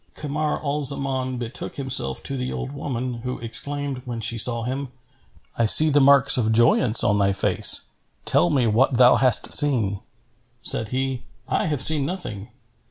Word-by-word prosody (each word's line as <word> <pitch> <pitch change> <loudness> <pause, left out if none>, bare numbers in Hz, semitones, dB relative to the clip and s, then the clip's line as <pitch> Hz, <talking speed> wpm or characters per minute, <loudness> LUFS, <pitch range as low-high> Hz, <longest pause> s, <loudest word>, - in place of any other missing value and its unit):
Kamar 150 +1 -4
al 145 0 -3
Zaman 135 -2 -1
betook 120 -1 -7
himself 130 - -3
to 135 - -3
the 125 -1 -5
old 135 - -6
woman, 130 -4 -6
who 125 +1 -6
exclaimed, 140 +3 -6
when 120 -2 -7
she 115 +1 -1
saw 115 0 +3
him, 135 +3 -5 0.7
"I 115 - +1
see 155 +7 +6
the 145 - +3
marks 140 -1 +4
of 110 -2 -1
joyance 115 0 +3
on 105 -1 0
thy 100 0 0
face: - - +3 0.4
tell 85 - +2
me 130 -4 0
what 120 +4 0
thou 125 0 +5
hast 130 -4 +3
seen." 115 -9 +3 0.6
Said 115 - +1
he, 130 +1 -4 0.3
"I - - -2
have 150 -4 0
seen 155 -3 +3
nothing. 135 - -7
130 Hz, 165 wpm, -21 LUFS, 115-140 Hz, 0.7 s, see